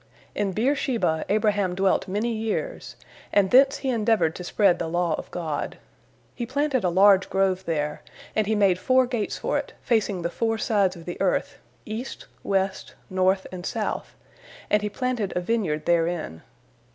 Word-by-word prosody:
In 205 -2 -1
Beer 245 +9 +1
sheba 205 - 0
Abraham 205 -3 +1
dwelt 190 0 +1
many 210 +5 -1
years, 225 - -3 0.4
and 195 -2 +3
thence 270 +2 +6
he - - +1
endeavored 220 -8 +2
to 180 - -7
spread 190 0 +2
the 165 - -2
law 175 0 0
of - - -8
God. 160 -4 -4 0.6
He 240 - -5
planted 280 -1 0
a 180 - +2
large 190 +2 +5
grove 190 -1 +1
there, 150 -2 -2 0.3
and 215 -2 +1
he 220 - +1
made 195 -3 +3
four 255 +6 +3
gates 240 -4 -2
for - - 0
it, - - -7
facing 205 -6 0
the 170 - -1
four 225 +2 0
sides 200 -4 +1
of 165 -1 -12
the 175 - -6
earth, 190 -2 0 0.3
east, 220 +4 -6 0.2
west, 195 -1 -1 0.2
north, 185 +1 +2
and 180 -1 -7
south, - - -3 0.6
and 210 - +4
he 210 - -2
planted 235 -3 -2
a - - +2
vineyard 180 -6 -1
therein. 165 - 0
195 Hz, 170 wpm, -25 LUFS, 180-225 Hz, 0.6 s, thence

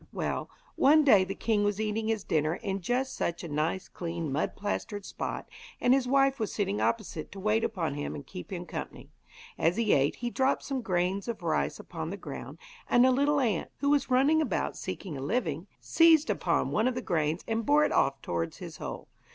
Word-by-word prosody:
Well, - - -3 0.3
one 305 +3 +6
day 215 -10 +6
the 190 +1 -4
king 215 -2 +1
was 205 0 0
eating 220 0 -1
his 220 -3 0
dinner 155 +1 +1
in 195 +1 -3
just 250 +7 -1
such 170 +1 -2
a - - -4
nice, 155 +5 -1
clean, 165 -3 -4
mud 140 - -1
plastered 205 0 -3
spot, - - -5 0.3
and 245 - +4
his 265 -2 +2
wife 275 0 +3
was 220 - -1
sitting 205 0 -1
opposite 210 -8 -2
to 195 - -8
wait 215 +3 +1
upon 165 -8 -1
him 145 0 -4
and 140 - -8
keep 90 - -9
him - - -4
company. - - -7 0.5
As 170 +4 +2
he 230 -2 +3
ate 140 +1 +2
he 240 0 -4
dropped 265 +2 +1
some 270 -2 -3
grains 185 0 -1
of 235 -2 -4
rice - - 0
upon - - -6
the - - -5
ground, - - -8 0.3
and 245 +1 +6
a 260 - +5
little 285 +3 +2
ant, 220 -10 0
who 280 0 +1
was 290 -1 +2
running 275 +5 +4
about 310 - -1
seeking 180 -7 -5
a - - -6
living, 165 - -1
seized 320 - +5
upon - - 0
one 220 +3 +2
of 255 - 0
the 250 - -3
grains 160 -1 0
and 225 0 -1
bore 295 +4 +4
it - - -1
off 135 0 +1
towards 85 -1 -2
his - - -8
hole. - - -6
210 Hz, 210 wpm, -29 LUFS, 170-255 Hz, 0.5 s, one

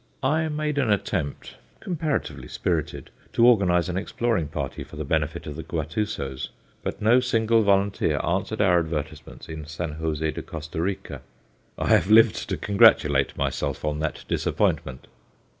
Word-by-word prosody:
I 155 +4 +2
made 150 -1 -1
an 130 -5 +1
attempt 90 -7 -2 0.2
comparatively 160 -5 -3
spirited - - -3 0.2
to 115 - +4
organize 95 -8 +4
an 90 0 -2
exploring 105 -3 -1
party 70 -3 -4
for - - -13
the - - -4
benefit - - -1
of 75 - -6
the 80 - -5
Guatusos, 80 -4 -3 0.3
but - - -4
no 115 +4 +6
single 115 -2 +2
volunteer 100 -1 +2
answered 95 +5 -1
our 90 -4 +4
advertisements 80 -3 -5
in 80 -2 -7
San 80 -1 -5
José 80 -1 -1
de - - -5
Costa 80 0 -6
Rica; 95 +2 -4 0.6
I - - -2
have 95 - +4
lived 110 0 +5
to - - -1
congratulate 75 -8 +4
myself - - -2
on 75 0 -1
that 75 0 -3
disappointment. 65 -1 -1
95 Hz, 150 wpm, -25 LUFS, 80-115 Hz, 0.6 s, no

